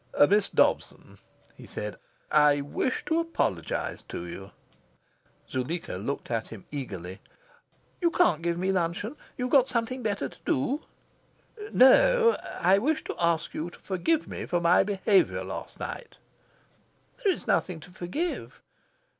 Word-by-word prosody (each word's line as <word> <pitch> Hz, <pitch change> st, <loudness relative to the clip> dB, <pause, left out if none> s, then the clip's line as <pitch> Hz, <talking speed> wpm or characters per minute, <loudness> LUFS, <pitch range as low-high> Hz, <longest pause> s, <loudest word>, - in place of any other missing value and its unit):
"Miss 205 Hz, 0 st, +3 dB
Dobson," -, -, 0 dB, 0.4 s
he -, -, -13 dB
said, 105 Hz, 0 st, -5 dB, 0.4 s
"I 150 Hz, -1 st, +5 dB
wish 145 Hz, -, -2 dB
to 325 Hz, 0 st, +1 dB
apologise 95 Hz, -, -2 dB
to 85 Hz, -, -5 dB
you." 95 Hz, +3 st, -8 dB, 1.0 s
Zuleika 140 Hz, +7 st, -3 dB
looked 120 Hz, +9 st, -4 dB
at 115 Hz, -1 st, -1 dB
him 110 Hz, -4 st, -11 dB
eagerly. 95 Hz, -, -6 dB, 0.8 s
"You 340 Hz, -, +4 dB
can't 180 Hz, -, +3 dB
give 170 Hz, 0 st, -1 dB
me 185 Hz, +2 st, 0 dB
luncheon? 185 Hz, -, -1 dB, 0.2 s
You've 250 Hz, 0 st, -2 dB
got 265 Hz, -2 st, +6 dB
something 250 Hz, +1 st, -2 dB
better 205 Hz, -, -1 dB
to -, -, -16 dB
do?" 270 Hz, -, 0 dB, 0.9 s
"No. 470 Hz, -, +6 dB, 0.2 s
I 190 Hz, +3 st, +5 dB
wish 310 Hz, +7 st, 0 dB
to -, -, -5 dB
ask 170 Hz, -1 st, +1 dB
you 165 Hz, +3 st, -3 dB
to -, -, -15 dB
forgive 305 Hz, -, 0 dB
me -, -, -6 dB
for 175 Hz, -, +1 dB
my 170 Hz, +1 st, +5 dB
behaviour 195 Hz, 0 st, +2 dB
last -, -, -7 dB
night." -, -, -6 dB, 1.1 s
"There 400 Hz, -, +4 dB
is -, -, -4 dB
nothing 180 Hz, -3 st, 0 dB
to 180 Hz, -, -13 dB
forgive." 185 Hz, -, -4 dB
180 Hz, 140 wpm, -27 LUFS, -, 1.1 s, got